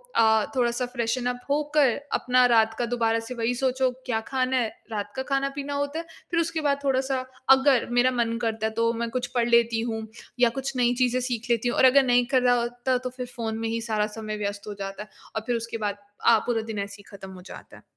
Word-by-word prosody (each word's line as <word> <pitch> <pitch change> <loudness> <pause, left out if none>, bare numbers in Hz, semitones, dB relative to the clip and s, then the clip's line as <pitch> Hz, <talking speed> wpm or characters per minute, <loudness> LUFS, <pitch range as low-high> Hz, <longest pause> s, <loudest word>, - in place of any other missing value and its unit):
अ, 220 -1 +4
थोड़ा-सा 240 0 +1
फ्रेशन 245 0 -2
उप 245 0 -4
होकर 295 -2 +3 0.2
अपना 250 0 +3
रात 225 -2 +4
का 240 - +1
दोबारा 230 -1 +1
से 250 - -5
वही 230 +1 0
सोचो 260 0 +1 0.2
क्या 225 -3 0
खाना 260 -1 0
है, 235 -3 +1 0.2
रात 205 -1 -3
का 265 - -2
खाना-पीना 275 +1 -2
होता 285 +3 -2
है। 335 - -6 0.3
फिर 335 - +2
उसके 325 -1 -1
बाद 280 -1 +1
थोड़ा-सा 265 -1 +1 0.3
अगर 265 -2 +5
मेरा 245 +1 +3
मन 230 -2 0
करता 220 -2 -1
है - - -4
तो 230 - +3
मैं 235 0 -3
कुछ 245 +1 -2
पढ़ 235 - +2
लेती 235 -1 +3
हूँ 220 -1 -3 0.3
या 245 -1 +5
कुछ 270 0 -4
नई 245 0 +3
चीजें 250 0 +2
सीख 245 -2 -3
लेती 235 +1 +2
हूँ। - - -2
और - - +6
अगर 270 +2 +6
नहीं 245 -1 +3
कर 260 - +5
रहा 245 0 +4
होता 245 +2 -1
तो 255 0 -4
फिर 250 - -3
फ़ोन 225 -2 -3
में 225 - -2
ही 230 0 -2
सारा 215 -2 0
समय 215 -1 -4
व्यस्त 205 0 -4
हो 205 - -4
जाता 195 +1 -5
है। 210 - -18 0.3
और 220 - -1
फिर 245 - +1
उसके 230 0 -4
बाद 205 -2 -2 0.3
अ, 230 -1 +7
पूरा 230 -2 0
दिन 220 -2 -5
ऐसे 200 0 -5
ही 205 - -15
ख़त्म 190 -1 -10
हो 185 - -11
जाता - - -11
है। - - -18
240 Hz, 240 wpm, -25 LUFS, 225-260 Hz, 0.3 s, अ